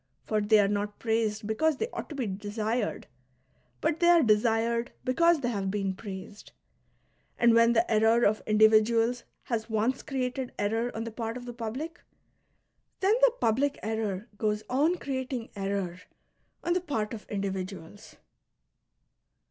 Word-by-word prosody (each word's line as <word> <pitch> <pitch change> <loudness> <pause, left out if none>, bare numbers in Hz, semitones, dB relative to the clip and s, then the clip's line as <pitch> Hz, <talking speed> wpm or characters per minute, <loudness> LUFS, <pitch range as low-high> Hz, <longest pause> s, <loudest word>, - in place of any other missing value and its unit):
For 215 -1 0
they 210 +1 +4
are 200 - +4
not 205 0 -2
praised 220 -1 -1
because 285 +8 +1
they 450 - -1
ought - - -5
to 305 - -7
be 265 -3 -2
desired, 210 +3 -2 0.8
but 325 - 0
they 345 -1 +4
are 340 -2 +6
desired 230 +2 +2
because 330 +5 +3
they 245 - 0
have 200 -4 -2
been 195 -1 -1
praised; 195 +1 -9 0.8
and 235 -1 +5
when 230 0 +5
the 230 0 +3
error 225 +2 +4
of 215 +1 +2
individuals 220 +2 +4 0.2
has 230 -2 -3
once 225 +4 0
ci 270 -3 -3
eated 250 0 -4
error 225 +4 0
on 225 - -3
the 230 - -6
part 225 +1 -4
of 245 - -9
the 240 - -6
public, 250 +9 -5 1.0
then 390 +2 +3
the - - +6
public 270 +6 +1
error 220 -1 -2
goes 210 -1 0
on 300 +7 +3
creating 260 -6 -4
error 195 -3 -3 0.6
on 345 - +1
the 360 - 0
part 225 - -2
of 215 - -9
individuals. 195 -1 -5
225 Hz, 155 wpm, -28 LUFS, 210-255 Hz, 1.0 s, are